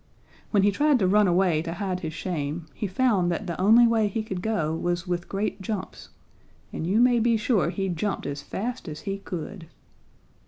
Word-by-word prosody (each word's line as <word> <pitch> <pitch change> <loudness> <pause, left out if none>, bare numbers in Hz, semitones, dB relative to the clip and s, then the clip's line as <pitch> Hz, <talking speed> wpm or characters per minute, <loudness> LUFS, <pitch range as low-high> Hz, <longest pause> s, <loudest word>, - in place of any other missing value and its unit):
When 200 -3 +3
he 205 - +4
tried 290 +6 +3
to 195 -6 +2
run 205 +2 +4
away 175 -3 +2
to 165 0 -4
hide 190 -2 -2
his 160 -4 -4
shame, 160 -2 -3
he 215 - -3
found 190 -3 +2
that 170 - -3
the 170 0 -4
only 225 +5 +7
way 225 -2 +3
he 220 +1 -2
could 190 -4 -5
go 165 -8 -1
was 175 +1 -2
with 175 -1 -3
great 200 0 -2
jumps, 190 -1 -5 0.6
and 160 - -3
you 200 +5 +2
may 245 0 +5
be 230 0 +3
sure 215 -5 +1
he 195 +2 -2
jumped 190 +3 -2
as 140 0 -4
fast 240 - -5
as 155 -1 -6
he 195 0 -4
could. 180 -1 -7
195 Hz, 200 wpm, -26 LUFS, 175-215 Hz, 0.6 s, only